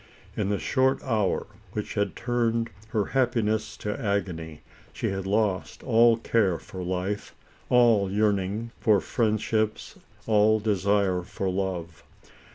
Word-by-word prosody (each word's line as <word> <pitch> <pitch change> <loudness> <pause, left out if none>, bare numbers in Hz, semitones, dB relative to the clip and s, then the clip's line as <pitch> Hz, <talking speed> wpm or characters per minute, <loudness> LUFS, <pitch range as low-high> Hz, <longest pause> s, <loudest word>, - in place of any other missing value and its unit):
In 100 -2 -1
the 100 - +1
short 130 +3 +1
hour, 110 -7 0 0.3
which - - -4
had 100 -1 -1
turned 115 -1 0 0.2
her 110 -2 0
happiness 110 -5 0
to 105 0 -4
agony, 85 -7 -2 0.3
she - - -2
had 95 0 -4
lost 100 -2 0
all 115 -1 +5
care 110 -6 +1
for 95 - -9
life, 95 +3 -3 0.3
all 115 -5 +4
yearning 105 +2 0
for 105 -3 +4
friend 110 +4 0
ships, 110 0 -2 0.3
all 110 0 +4
desire 100 -2 +1
for 95 +1 -3
love. 90 -4 -3
105 Hz, 130 wpm, -26 LUFS, 95-115 Hz, 0.3 s, all